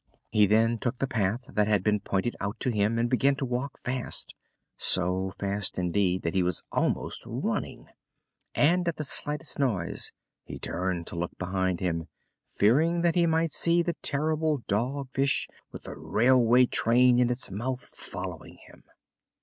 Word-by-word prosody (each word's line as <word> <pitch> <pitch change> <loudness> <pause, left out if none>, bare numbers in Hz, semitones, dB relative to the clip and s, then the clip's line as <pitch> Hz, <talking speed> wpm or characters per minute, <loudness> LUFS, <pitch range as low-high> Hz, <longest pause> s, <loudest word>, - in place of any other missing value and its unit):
He 105 -1 +5
then 115 +3 +3
took 125 +3 -2
the 135 - 0
path 110 -3 -1
that 105 -1 +1
had 105 -3 +2
been 105 0 +2
pointed 100 +4 -1
out 100 +1 -4
to 130 - +1
him 105 +1 +1
and 115 +1 +2
began 135 +3 +2
to 135 0 -3
walk 125 +3 -3
fast 125 -1 -2 0.4
so 95 +1 +1
fast, 100 0 -1
indeed, 90 +1 +1
that 85 - -1
he 95 - +2
was 90 -1 -1
almost - - -1
running. - - -3 0.7
And 175 +4 +3
at 170 - 0
the 155 - -4
slightest 150 +1 -1
noise 105 -11 -1 0.3
he - - -8
turned 90 -2 -2
to - - -8
look 85 +1 -4
behind 95 -1 -1
him, 85 -3 -1 0.4
fearing 160 +11 +2
that 170 -1 +3
he 175 -2 +3
might 160 0 +1
see 170 +2 +2
the 170 - -1
terrible 155 -1 0
Dog 130 +6 -1
Fish 135 0 +1 0.2
with - - -10
a - - -6
railway 125 +1 +4
train 125 +1 +4
in 125 -1 +3
its 125 -4 -2
mouth 125 +6 -3
following - - -8
him. - - -18
120 Hz, 165 wpm, -28 LUFS, 100-140 Hz, 0.7 s, He